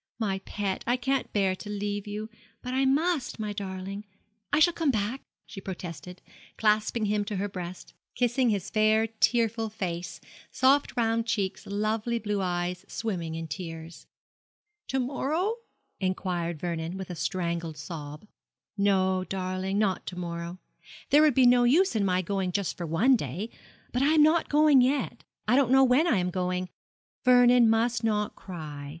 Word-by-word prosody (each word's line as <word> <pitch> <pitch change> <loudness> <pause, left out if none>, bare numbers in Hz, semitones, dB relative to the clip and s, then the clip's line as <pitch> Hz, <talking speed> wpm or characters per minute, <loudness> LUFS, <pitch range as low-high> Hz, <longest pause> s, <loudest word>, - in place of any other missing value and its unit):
'My 195 -4 -1
pet, 195 -1 -3
I 245 +1 +2
can't 270 +2 -1
bear 195 -2 +1
to 210 - -9
leave 205 0 -3
you, 210 +1 -4 0.4
but 250 0 -4
I 265 +1 +2
must; 295 +1 +1
my 210 -2 -3
darling, 195 0 -5 0.5
I - - +3
shall 335 +3 +5
come 325 -3 0
back,' 230 +2 -1 0.2
she 195 - -9
protested, 180 -2 -8 0.3
clasping 215 +1 +2
him 205 0 +1
to 210 - -4
her 195 +2 -1
breast, 180 -2 -8 0.2
kissing 245 +1 +2
his 200 -4 -2
fair 215 0 +3
tearful 225 0 +1
face, 180 -5 -5 0.3
soft 270 +1 +2
round 230 0 +1
cheeks, 200 -4 -2
lovely 215 +3 -1
blue 210 -3 -2
eyes 180 0 -2
swimming 175 -8 -3
in 165 0 -5
tears. 165 +2 -8 0.8
'To 265 - -1
morrow?' 310 - -1 0.4
inquired 180 -3 -2
Vernon, 170 +1 -3
with 190 -1 -6
a - - -5
strangled 170 0 -2
sob. 150 +1 -8 0.5
'No, 190 -2 +2
darling, 185 +1 -2
not 200 -3 0
to 180 - -5
morrow; 170 0 -5 0.5
there 295 - +7
would 305 -5 +4
be 260 - +5
no 245 0 +6
use 300 +5 +4
in 210 - +2
my 185 -1 +1
going 190 0 -1
just 195 0 -1
for 175 - -5
one 220 +12 +4
day; 185 - -4 0.4
but 250 - 0
I 290 +3 +4
am 300 - +7
not 315 +2 +3
going 295 -2 +6
yet 255 -2 0 0.2
I 230 - +4
don't 270 -3 +3
know 265 +1 +6
when 265 +6 +4
I 280 - +3
am 180 0 0
going 180 0 -2 0.5
Vernon 245 -2 +6
must 230 +1 +1
not 210 -2 0
cry. 150 -6 -8
205 Hz, 165 wpm, -28 LUFS, 180-245 Hz, 0.8 s, there